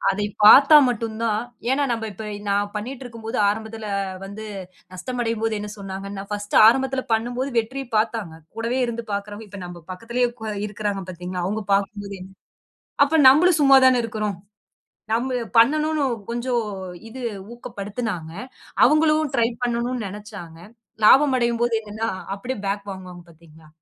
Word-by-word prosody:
அதைய 205 +2 0 0.2
பாத்தா 280 +7 +9
மட்டும்தான் 225 -2 -1 0.3
ஏனா 280 +2 +2
நம்ப 225 -1 -3
இப்ப 220 +3 -8 0.2
நா 200 - +2 0.2
பண்ணிட்டு 250 +5 -6
இருக்கும்போது 230 -2 -6
ஆரம்பத்துல 220 +1 -4 0.4
வந்து 200 +3 -8 0.5
நஷ்டமடையும் 230 +2 -3
போது 220 -2 0
என்ன 210 - -6
சொன்னாங்கனா, 195 0 -6
ஃபர்ஸ்ட் 205 0 -3
ஆரம்பத்துல 265 +2 +1
பண்ணும்போது 245 +4 -1
வெற்றி 260 +5 -2
பாத்தாங்க. 215 -6 -1 0.2
கூடவே 235 +3 -1
இருந்து 235 0 -4
பாக்குறவங்க 205 +1 -5
இப்ப 200 0 -9
நம்ப 175 -1 -10
பக்கத்திலே 235 +5 -1
கு - - -7 0.2
இருக்காங்க 205 -2 -3
பாத்தீங்களா, 180 0 -5
அவங்க 210 +3 -2
பாக்கும்போது 200 0 -2
என 190 +1 -11 0.7
அப்ப 285 +3 -3
நம்மளும் 320 +4 +5
சும்மா 275 -1 +7
தானா 260 -1 +5
இருக்குறோம். 215 -3 -3 0.8
நம்மு 250 +3 0 0.2
பண்ணணுன்னு 305 +5 +3 0.3
கொஞ்சம் 240 0 -1 0.4
இது 255 +3 -9 0.3
ஊக்கப்படுத்துனாங்க. 205 -7 -5 0.5
அவங்களும் 305 +1 +3
ட்ரை 235 -2 +3 0.2
பண்ணணும்னு 240 -1 -1
நினைச்சாங்க. 200 -4 -9 0.5
லாபம் 270 +3 +6
அடையும்போது 235 -1 +1
என்னன்னா 220 +1 -4 0.3
அப்படியே 245 +5 -5
பேக் 200 0 -3
வாங்குவாங்க 180 -2 -10
பாத்தீங்களா? 160 -1 -19
225 Hz, 135 wpm, -23 LUFS, 200-245 Hz, 0.8 s, பாத்தா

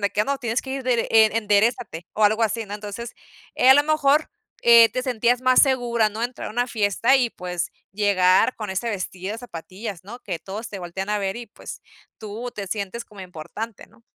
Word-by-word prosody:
de 200 0 0
qué, - - 0
ah, - - -3
no, 280 +2 -1
tienes 235 -2 -1
que 265 - -8
ir 270 0 -3
dere 250 -2 +1
e 220 -1 +5
enderézate, 210 -4 +1
o 215 - -1
algo 215 +2 +3
así, 225 +1 0
¿no? 205 - -6
Entonces, 210 +3 -7 0.4
eh, 255 - +4
a 265 - +10
lo 290 - +5
mejor, 305 0 +2 0.3
eh, 235 -1 +8
te 255 - -2
sentías 245 -1 +1
más 255 0 +5
segura 240 -5 +2
¿no? 220 +2 -5
Entrar 245 +1 -4
a - - -8
una 245 +2 0
fiesta 225 +3 +2
y, 245 -3 +1
pues, 180 -3 -4 0.2
llegar 195 +2 +3
con 215 -3 -5
ese 195 +5 -2
vestido, 190 0 -4
zapatillas, 195 -3 -8
¿no? 230 +5 -9
Que 185 -8 -5
todos 195 +7 -7
te 200 - -7
voltean 185 +2 -5
a 210 - +1
ver, 195 0 -2
y, 240 0 -7
pues, - - -10 0.4
tú 220 +3 -6
te 200 - -5
sientes 205 +3 -4
como 205 -2 -14
importante, 185 +5 -8
¿no? - - -25
220 Hz, 215 wpm, -23 LUFS, 200-245 Hz, 0.4 s, a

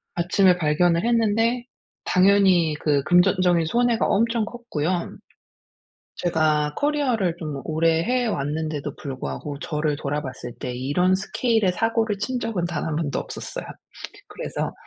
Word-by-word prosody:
아침에 180 +1 +3
발견을 170 +4 +2
했는데 230 +1 +2 0.4
당연히 185 -4 +4
그 145 -3 +1
금전적인 180 -1 +3
손해가 235 +5 +1
엄청 230 +1 +1
컸고요. 185 -8 -3 1.1
제가 155 -3 +1
커리어를 255 - 0
좀 150 -4 -5
오래 165 +1 +1
해 250 +1 +1
왔는데도 155 -4 -3
불구하고 140 +1 -6
저를 150 -2 -1
돌아봤을 140 -4 -4
때 125 - -4
이런 145 +9 +1
스케일의 215 0 0
사고를 225 +1 0
친 245 +5 -2
적은 220 -7 -2
단 170 - -3
1 155 -2 -2
번도 145 -5 -1
없었어요. - - -6 0.6
그래서 - - -4
175 Hz, 290 characters per minute, -23 LUFS, 155-225 Hz, 1.1 s, 당연히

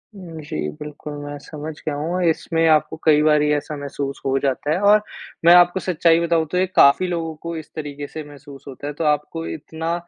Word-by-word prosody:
जी, 165 -5 -6
बिल्कुल, 150 0 -8
मैं 145 0 -6
समझ 155 +2 -8
गया 150 -2 -2
हूँ 170 +5 -2
इसमें 165 0 0
आपको 155 +1 +2
कई 150 -2 +5
बार 150 -1 +4
ही 150 0 +2
ऐसा 150 +1 -3
महसूस 140 -1 -5
हो 135 0 +1
जाता 140 +2 -1
है 175 - +1
और 210 0 +5 0.4
मैं 170 - +9
आपको 175 +1 +5
सच्चाई 170 -2 +2
बताऊँ 170 -1 +1
तो 180 - 0
ये 185 - +3
काफ़ी 140 +7 +5
लोगों 165 -2 -3
को 170 0 -5
इस 155 - -9
तरीके 145 -2 -6
से 155 - -7
महसूस 140 -1 -13
होता 140 +1 -8
है 145 - -4
तो 160 - -4
आपको 150 +2 -1
इतना 160 +2 -4
155 Hz, 210 wpm, -21 LUFS, 145-165 Hz, 0.4 s, मैं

